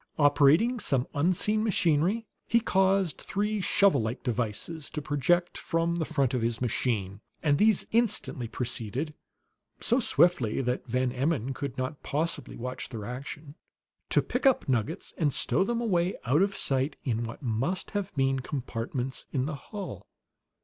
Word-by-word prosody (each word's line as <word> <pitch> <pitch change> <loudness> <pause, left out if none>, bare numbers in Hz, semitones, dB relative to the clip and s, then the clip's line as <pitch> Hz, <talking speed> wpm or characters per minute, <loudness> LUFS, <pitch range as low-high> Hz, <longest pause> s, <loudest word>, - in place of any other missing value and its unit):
Operating 150 - +4
some 135 - +2
unseen 185 +8 +2
machinery, 185 +1 +2 0.2
he 235 - +4
caused 190 -5 +2
three 210 +1 -1
shovel 195 -5 +3
like 110 +3 -3
devices 125 +6 -2
to 150 - -4
project 150 +4 +1
from 165 +1 0
the 160 - -1
front 135 -3 0
of 125 - 0
his 115 0 -1
machine; 110 -5 -1 0.2
and 145 -2 +3
these 215 -2 +4
instantly 215 - +1
proceeded, 125 +5 -3 0.7
so 240 +3 +2
swiftly 170 - +3
that 125 0 -2
Van 125 +1 0
Emmon 135 -1 -1
could 135 -1 -5
not 130 +3 -3
possibly 160 +4 -2
watch 125 +2 -5
their 110 -5 -6
action, 140 +4 -7 0.6
to - - +3
pick 250 +2 0
up 265 - +3
nuggets 130 - -1
and 150 -4 +2
stow 190 - +2
them 235 +4 -1
away 185 -6 +1
out 140 +7 +3
of 200 0 +1
sight 135 +2 0
in 120 -3 -1
what 115 +5 -7
must 130 +10 -1
have 205 -2 -2
been 135 -1 +2
compartments 130 -1 -3
in 130 -2 0
the 155 - -3 0.2
hull. 205 -2 -7
145 Hz, 155 wpm, -28 LUFS, 125-185 Hz, 0.7 s, Operating